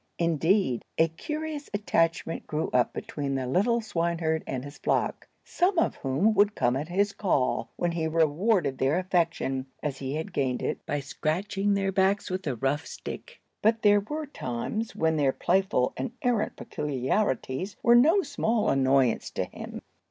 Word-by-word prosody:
Indeed, 170 - +2
a 165 0 +4
curious 300 - -5
attachment 165 -5 0
grew 155 +1 -2
up 125 -1 +3
between 140 -2 -4
the 130 -1 -1
little 205 - +2
swineherd 165 -5 -1
and 130 0 -3
his 145 +2 -10
flock, - - -1 0.2
some 365 +1 +1
of - - +2
whom 145 +12 +1
would 205 0 +3
come 120 +1 +2
at 145 +3 -3
his 200 +3 +1
call, 130 - 0
when 175 - 0
he 165 -1 -1
rewarded 160 - +1
their 135 +5 +2
affection, 170 -7 0 0.2
as 140 -4 -3
he 135 +1 -3
had 160 +1 -4
gained 130 -3 -1
it, - - -2
by 145 0 -1
scratching 195 +8 -1
their 195 -1 0
backs 190 +1 +1
with 185 -2 -3
a 135 - 0
rough 135 +6 -1
stick. - - -8 0.2
But 225 +1 +2
there 205 -1 +6
were 300 +10 -4
times 215 - -4
when 160 0 +1
their 140 -3 +3
playful 180 -6 +1
and 130 - -4
errant 240 -4 +1
peculiarities 140 - -2
were 235 - +6
no 320 +11 +6
small 235 -7 0
annoyance 135 -2 +2
to - - -2
him. - - -8
165 Hz, 165 wpm, -27 LUFS, 140-205 Hz, 0.2 s, there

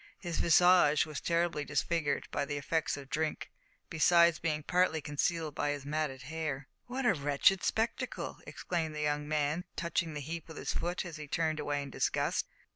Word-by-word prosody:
His 175 -3 -4
visage 175 -3 +5
was 155 -2 -6
terribly 170 -3 0
disfigured 150 +1 -1
by 145 - 0
the 145 0 -3
effects 155 +2 -1
of 140 -1 -9
drink, 155 0 -2 0.4
besides 170 +1 +4
being 155 -2 -1
partly 180 -1 +2
concealed 155 +1 -1
by 145 - -1
his 145 -1 -3
matted 145 -2 -2
hair. 145 -2 -4 0.2
"What 255 +1 -3
a 240 - +5
wretched 145 +5 +3
spectacle!" 235 +3 -1
exclaimed 160 -3 -3
the 150 - -3
young 150 0 0
man, 150 +2 0
touching 170 -1 -1
the - - -3
heap 165 +4 -6
with 160 - -10
his - - -3
foot 175 +3 -2
as 170 -2 -7
he 155 -1 -7
turned 155 +1 0
away 145 -1 -1
in 140 - -8
disgust. - - 0
155 Hz, 180 wpm, -32 LUFS, 145-170 Hz, 0.4 s, visage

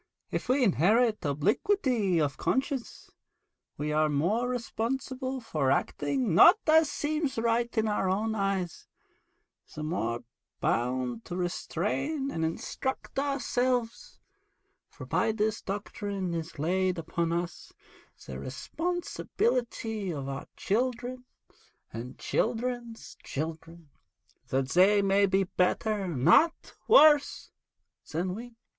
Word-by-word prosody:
If - - -3
we 260 +1 +3
inherit 215 - +3
obliquity 205 - +1
of 145 -3 0
conscience, 265 -2 -2 0.7
we 150 +1 -2
are 155 0 +2
the 145 - -1
more 215 +12 +1
responsible 260 +2 -3
for 155 - -1
acting 155 - 0
not 345 - +8
as 315 -1 +5
seems 300 -2 -2
right 235 +1 +1
in 220 0 +2
our 210 -3 0
own 215 +4 0
eyes, 195 -4 -2 0.9
the 155 - -5
more 120 -8 -2 0.4
bound 125 0 -1
to 175 - -5
restrain 215 - -2
and 160 - -2
instruct 265 +12 -3
ourselves, 250 -4 -1 0.7
for - - -10
by - - +1
this 215 0 -1
doctrine 200 -2 -4
is 165 -1 -5
laid 185 +4 0
upon 165 +1 -2
us 170 +1 -4 0.5
the - - -7
responsibility 255 - -2
of 140 -4 -5
our 135 0 -5
children 250 +3 -1 0.7
and 115 +3 -7
children's 240 0 -2
children, 165 +1 -6 0.6
that 130 0 -1
they 200 +5 +5
may 195 +1 +4
be 195 +1 +2
better, 195 +2 0
not 175 - +3
worse, 310 - +5 0.6
than 175 +4 -1
we.' 235 +3 -8
205 Hz, 115 wpm, -29 LUFS, 165-250 Hz, 0.9 s, not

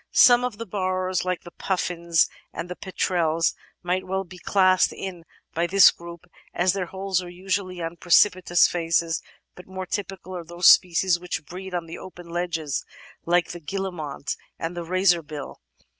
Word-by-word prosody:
Some 245 0 +7
of 250 -4 -3
the 230 - -5
burrowers, 185 -2 -1
like 180 -1 -2
the 175 - -11
Puffins 170 -3 0 0.2
and 170 +1 -6
the - - -4
Petrels, 170 -4 0 0.3
might 180 +1 0
well 190 +1 -1
be 185 0 -13
classed 185 0 +3
in 180 -3 -7 0.3
this 175 +4 +6
group 170 0 -11 0.3
as 180 +1 +2
their 190 -3 -2
holes 190 0 -1
are 180 - -8
usually 185 0 -3
on 165 +1 -5
precipitous 175 0 +4
faces, 165 -1 0 0.3
but 180 - -14
more 190 0 -6
typical 185 -1 -5
are 175 - -5
those 175 +2 -4
species 180 0 +5
which 175 -3 -5
breed 185 +2 -7
on 175 -1 -2
the 165 - -8
open 175 -2 -11
ledges, 165 -5 -2 0.4
like 175 0 +2
the 175 - -7
Guillemot 175 -5 -4 0.2
and 165 +2 -4
the 175 - -4
Razorbill. 170 -5 0
180 Hz, 160 wpm, -24 LUFS, 170-185 Hz, 0.4 s, Some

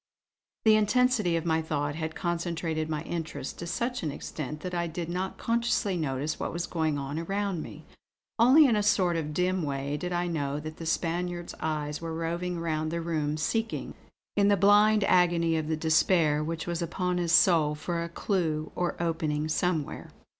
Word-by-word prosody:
The 220 -1 +7
intensity 215 -3 +3
of 165 - -4
my 160 -1 +2
thought 145 -2 -2
had 160 +1 -4
concentrated 165 -2 -2
my 155 0 -2
interests 155 -5 -4
to 170 - -5
such 240 +8 -2
an 155 - -2
extent 150 +1 -6
that 180 -1 -5
I 170 -1 0
did 165 +1 -5
not 185 +2 -3
consciously 230 -4 0
notice 150 -2 -2
what - - -2
was 170 +1 -3
going 160 -3 -1
on 140 +2 -3
around 195 0 -2
me. - - -10 0.5
Only 260 +7 +7
in 240 -5 +4
a 210 - +2
sort 185 -4 +2
of 155 -2 -2
dim 180 +3 0
way 140 -1 -2
did 180 +4 -4
I 175 0 0
know 145 -4 -2
that 155 +1 -7
the 165 - -6
Spaniard's 175 +1 -2
eyes 150 -1 -2
were 165 -1 -4
roving 170 +2 -2
round 155 -2 -1
the 170 - -2
room; 155 -3 -1
seeking, 225 +8 -2 0.4
in 200 -1 +4
the 205 0 +4
blind 205 +2 +5
agony 170 -3 +3
of 155 -1 -1
the 160 0 -1
despair 155 -1 +3
which 165 +1 -3
was 170 0 -3
upon 180 +1 -1
his 170 -2 0
soul 160 -4 +5
for 170 +2 -3
a 170 - -5
clue 165 -4 -1
or 175 -1 -1
opening 160 -3 -1
somewhere. 160 -2 -1
170 Hz, 185 wpm, -28 LUFS, 155-180 Hz, 0.5 s, The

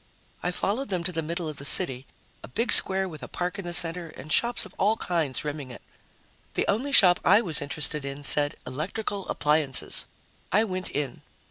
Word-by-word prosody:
I 180 - -1
followed 205 +8 -2
them 180 -3 -2
to 180 - -2
the 165 -2 -1
middle 165 +1 -4
of 155 -2 -7
the - - -6
city, 135 -4 +3 0.3
a - - -10
big 225 - -1
square 190 0 +5
with 155 -4 -10
a - - -7
park 180 +2 -4
in 195 - -7
the 175 - -4
center 170 0 +2
and 150 0 -5
shops 240 0 +3
of - - -14
all 215 +3 +2
kinds 160 - -2
rimming 145 -3 -5
it. 125 - -11 0.7
The - - 0
only 245 +8 -1
shop 180 -9 +6
I - - +5
was 170 -9 -1
interested 145 0 -1
in 140 +1 -7
said: 145 +1 +3
ELECTRICAL 190 +9 -5
APPLIANCES. 150 -3 +2 0.4
I 210 +4 +3
went 185 -4 -4
in. 140 -4 -4
170 Hz, 200 wpm, -26 LUFS, 145-190 Hz, 0.7 s, shop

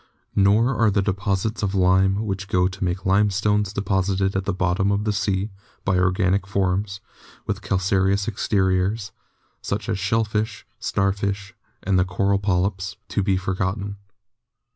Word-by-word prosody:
Nor 105 +6 +4
are 115 -2 +3
the 100 -1 +1
deposits 100 +2 -1
of 100 -1 -1
lime 95 +3 +3
which 95 -1 -3
go 90 -2 +2
to 95 +1 -5
make 90 +1 -2
limestones 105 +1 +2
deposited 95 -1 0
at 95 0 -1
the 100 - 0
bottom 95 +2 +1
of 100 +1 0
the 105 -1 0
sea 100 +1 -1 0.3
by 95 - +2
organic 95 +1 +1
forms 95 +1 -1 0.4
with - - -3
calcareous 95 +1 +1
exteriors, 100 -1 0 0.5
such 100 +1 -3
as 105 -4 -1
shellfish, 110 +1 -1
star 95 0 +1
fish, 100 0 -3 0.3
and 95 -1 +2
the 90 - +3
coral 100 +2 +1
polyps, 95 0 -1
to - - 0
be 95 -1 +1
forgotten. 95 +2 -2
100 Hz, 145 wpm, -23 LUFS, 95-100 Hz, 0.5 s, Nor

